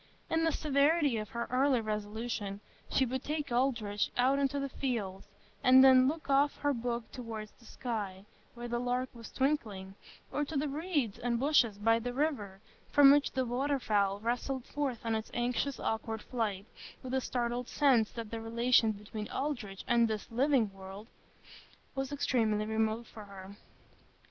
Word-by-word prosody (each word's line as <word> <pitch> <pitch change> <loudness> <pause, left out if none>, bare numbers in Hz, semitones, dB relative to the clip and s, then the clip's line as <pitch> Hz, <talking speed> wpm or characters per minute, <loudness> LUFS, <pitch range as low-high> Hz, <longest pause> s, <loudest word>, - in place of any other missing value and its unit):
In 325 0 +2
the 325 - +3
severity 290 -2 +2
of 215 -1 -4
her 235 0 -4
early 260 0 +3
resolution, 210 -1 -4 0.3
she 265 - +2
would 260 +1 -3
take 295 -2 -3
Aldrich 235 -5 0
out 260 +3 +3
into 280 0 0
the 275 - -2
fields, 220 -9 -3 0.4
and 260 0 +8
then 260 -1 +7
look 310 +3 -3
off 280 +1 +3
her 290 -1 +1
book 235 -1 -3
toward 225 -4 -6
the 235 - -19
sky, 205 -6 -5 0.3
where 240 0 -6
the 240 0 -1
lark 250 +1 -1
was 230 -2 -10
twinkling, 215 -9 -1 0.4
or 295 - 0
to 295 +1 -3
the 295 +2 0
reeds 290 - -2
and 235 -1 0
bushes 255 -7 +3
by 225 +2 +3
the 245 +1 -4
river, 215 -10 -2 0.3
from 285 -1 +8
which 290 0 +3
the 260 0 0
waterfowl 240 -6 0
rustled 245 +3 -2
forth 275 -6 -3
on 225 - 0
its 220 0 -3
anxious, 245 +3 -1
awkward 220 0 -3
flight,—with 225 +2 -5
a 265 - +1
startled 245 0 -2
sense 255 -7 +3
that 230 -2 -7
the 225 -1 -4
relation 230 0 +3
between 210 +1 -7
Aldrich 245 -10 -4
and 235 -1 +4
this 215 -1 -4
living 245 -4 +2
world 195 +3 -10 0.8
was 270 0 -3
extremely 225 -7 +1
remote 220 +1 0
for 215 -2 -11
her. 195 0 -11
240 Hz, 165 wpm, -32 LUFS, 215-275 Hz, 0.8 s, and